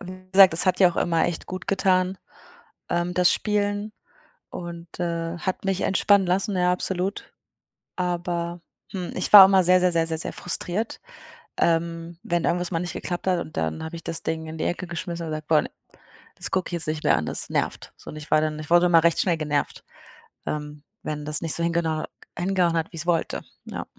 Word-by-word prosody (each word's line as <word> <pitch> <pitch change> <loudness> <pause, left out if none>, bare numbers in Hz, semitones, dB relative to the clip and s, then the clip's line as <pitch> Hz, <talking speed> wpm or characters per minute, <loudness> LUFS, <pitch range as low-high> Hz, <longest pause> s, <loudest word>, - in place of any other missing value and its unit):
wie 185 0 -9
gesagt, 190 -3 +8
es 170 - +2
hat 185 - +2
ja 180 -2 +7
auch - - -11
immer 165 -1 +1
echt 170 - -4
gut 185 0 -7
getan, 185 -1 +1 0.7
ähm, 175 +1 -1
das 180 -1 +4
Spielen 205 0 -1 0.6
und, 170 -1 -7
äh, 170 -1 -2
hat 185 +2 -3
mich 195 -1 0
entspannen 195 0 +3
lassen, 195 +2 0
ja, 180 0 +3
absolut, 185 +2 -3 0.6
aber, 175 -1 -2 0.3
hm, 185 -3 -5
ich 185 - -1
war 200 -2 +13
auch 190 - +5
immer 190 -2 +4
sehr, 180 +1 +5
sehr, 180 -1 +2
sehr, 165 -1 +1
sehr, 160 -1 -2
sehr - - -4
frustriert, 180 +5 -2 0.6
ähm, 165 0 0
wenn 175 -1 -1
irgendwas 175 +1 0
mal 165 - 0
nicht 175 -1 -4
geklappt 175 +1 -5
hat 180 -2 +2
und 155 - -8
dann 80 -1 -2
habe 160 +1 -6
ich 165 - -9
das 165 - -3
Ding 160 0 -3
in 160 0 -7
die - - -2
Ecke 175 0 -3
geschmissen 170 0 -5
und 155 - -5
gesagt: 155 0 -5
„Boah 155 -1 +4
ne, - - -8 0.7
das - - -3
gucke 185 -1 -1
ich - - -9
jetzt 170 -1 -1
nicht 155 0 -3
mehr - - +4
an, 75 - -2
das - - -3
nervt,“ - - -3
so - - -12
und - - -10
ich 150 0 -10
war 155 - +5
dann 155 -1 -2
ich 150 - -8
wurde 175 +1 +5
immer 165 -2 +5
recht 170 -1 +3
schnell 170 -3 +2
genervt, 150 -2 -2 0.6
ähm, 150 -1 -5 0.2
wenn 150 -1 -4
das 150 +1 +1
nicht 160 -4 0
so 170 - -2
hingenau 165 -2 0 0.3
hingehauen 180 -2 +1
hat, 165 0 -2
wie - - -9
ich's 165 +1 -4
wollte, 170 -2 0 0.2
ja. - - -6
175 Hz, 215 wpm, -24 LUFS, 165-185 Hz, 0.7 s, war